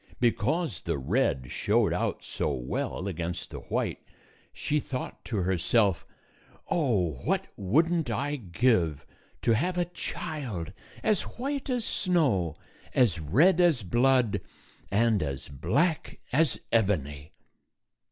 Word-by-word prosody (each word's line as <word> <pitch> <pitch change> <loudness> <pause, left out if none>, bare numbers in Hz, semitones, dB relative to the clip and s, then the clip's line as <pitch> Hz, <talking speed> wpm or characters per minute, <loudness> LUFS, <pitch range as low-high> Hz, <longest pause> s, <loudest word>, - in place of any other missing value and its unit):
Because 120 - +1
the 85 -3 -2
red 70 - 0
showed - - +2
out - - -2
so - - -1
well 65 +9 -3
against 85 -2 -4
the - - -6
white, - - -2 0.5
she 150 - -1
thought 130 -2 -5
to 105 -7 -1
herself, 95 +2 +2 0.3
" - - -26
Oh! 100 - +1
231 - - -6
What - - +1
would 140 - +2
n't 165 -7 0
I 140 +6 -1
give 90 - +1 0.4
to - - +3
have 175 +11 0
a 175 - +2
child 135 - -5 0.3
as 215 -4 +3 0.2
white 275 +2 -3
as 245 -4 0
snow, 130 - +1 0.4
as 110 -10 +3
red 155 - +4
as 160 -10 +4
blood, 120 0 +3 0.5
and 110 0 +3
as 70 -2 -4
black 90 - 0
as 155 0 +3
ebony 75 -10 0
115 Hz, 130 wpm, -28 LUFS, -, 0.5 s, red